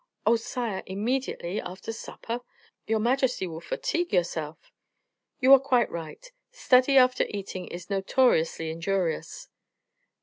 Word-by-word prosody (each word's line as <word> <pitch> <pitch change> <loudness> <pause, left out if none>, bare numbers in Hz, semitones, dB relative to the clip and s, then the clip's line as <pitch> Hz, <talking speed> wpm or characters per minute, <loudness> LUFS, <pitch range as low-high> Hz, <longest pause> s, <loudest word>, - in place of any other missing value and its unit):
"Oh! 230 - +5
sire, 230 -3 -3
immediately 210 -2 -2
after 185 +5 -7
supper? 230 +1 -6 0.5
Your 220 - +2
majesty 250 -1 +1
will 165 -2 -7
fatigue 345 - -2
yourself." 160 -3 -2 0.7
"You 265 +1 +7
are 275 - +9
quite 255 -3 +1
right; 170 - -8 0.2
study 275 - +4
after 255 -1 +5
eating 190 -3 -6
is 175 +1 -8
notoriously 195 -5 +1
injurious." 170 0 -2
215 Hz, 115 wpm, -27 LUFS, 175-255 Hz, 0.7 s, are